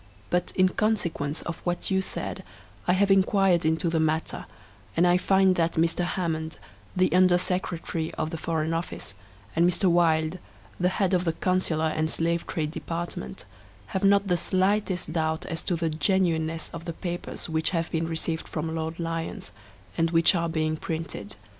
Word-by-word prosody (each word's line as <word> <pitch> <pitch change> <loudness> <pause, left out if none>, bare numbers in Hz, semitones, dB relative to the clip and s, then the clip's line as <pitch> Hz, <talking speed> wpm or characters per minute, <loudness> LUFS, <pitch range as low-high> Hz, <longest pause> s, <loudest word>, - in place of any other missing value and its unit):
But, 180 0 +1
in 185 0 +4
consequence 175 -8 0
of 170 - -5
what 175 +2 -2
you 190 0 +3
said - - -2 0.4
I 180 - +4
have 195 +1 +3
inquired 195 -2 +4
into 160 +2 +1
the 165 -1 +1
matter, 160 0 -1 0.5
and 170 - +5
I 175 0 +5
find 190 0 +4
that 165 0 +2
Mr. 165 +2 +1
Hammond, 160 -3 -2 0.4
the 185 0 +2
Under 180 -1 +5
Secretary 170 -3 -2
of 155 0 -2
the 165 - -3
Foreign 160 0 -1
Office, 165 - -3 0.4
and 165 - +3
Mr. 180 +1 +2
Wylde, 165 0 +2 0.4
the 180 0 +3
head 190 0 0
of 180 -1 +3
the 165 -2 0
Consular 160 -3 +1
and 155 0 0
Slave 170 +1 0
Trade 155 -2 -2
Department, 160 - -5 0.5
have 190 - -1
not 200 0 +4
the 180 -2 +2
slightest 185 -2 0
doubt 160 -1 -1
as 165 - -3
to 180 - -1
the 165 0 -1
genuineness 165 -2 +1
of 165 - -7
the 170 - -4
papers 175 +1 -5
which 160 -1 +1
have 165 -2 -2
been 165 0 0
received 160 0 -2
from 160 0 -3
Lord 160 +1 -3
Lyons, 165 -1 -3 0.5
and 165 0 +3
which 165 +2 +4
are 170 -2 0
being 155 -1 0
printed. 155 -12 -5
170 Hz, 170 wpm, -26 LUFS, 160-180 Hz, 0.5 s, and